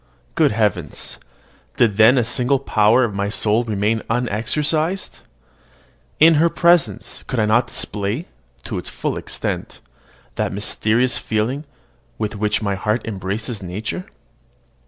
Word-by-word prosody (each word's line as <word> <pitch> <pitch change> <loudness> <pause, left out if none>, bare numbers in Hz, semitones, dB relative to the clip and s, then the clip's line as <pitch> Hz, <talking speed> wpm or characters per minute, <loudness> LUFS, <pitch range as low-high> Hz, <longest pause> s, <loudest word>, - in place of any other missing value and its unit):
Good - - +3
heavens! 105 -9 -1 0.6
did 110 -4 +3
then 110 +5 +6
a 125 - +4
single 125 +3 +2
power 115 -2 +3
of 115 -4 -1
my 100 +1 -1
soul 110 +2 +1
remain 110 0 0
unexercised? 145 - -1 1.0
In 165 +2 +7
her 170 - +4
presence 170 -1 +2
could 130 - -3
I 110 - +3
not 120 +3 +3
display, 105 - -2 0.4
to - - -4
its - - -7
full - - -3
extent, - - -4 0.6
that - - 0
mysterious 110 +4 0
feeling 120 +7 -2 0.5
with 110 0 -3
which 105 +1 0
my 100 -1 0
heart 105 +4 -1
embraces 105 +2 -4
nature? 105 - -5
110 Hz, 130 wpm, -20 LUFS, 105-130 Hz, 1.0 s, In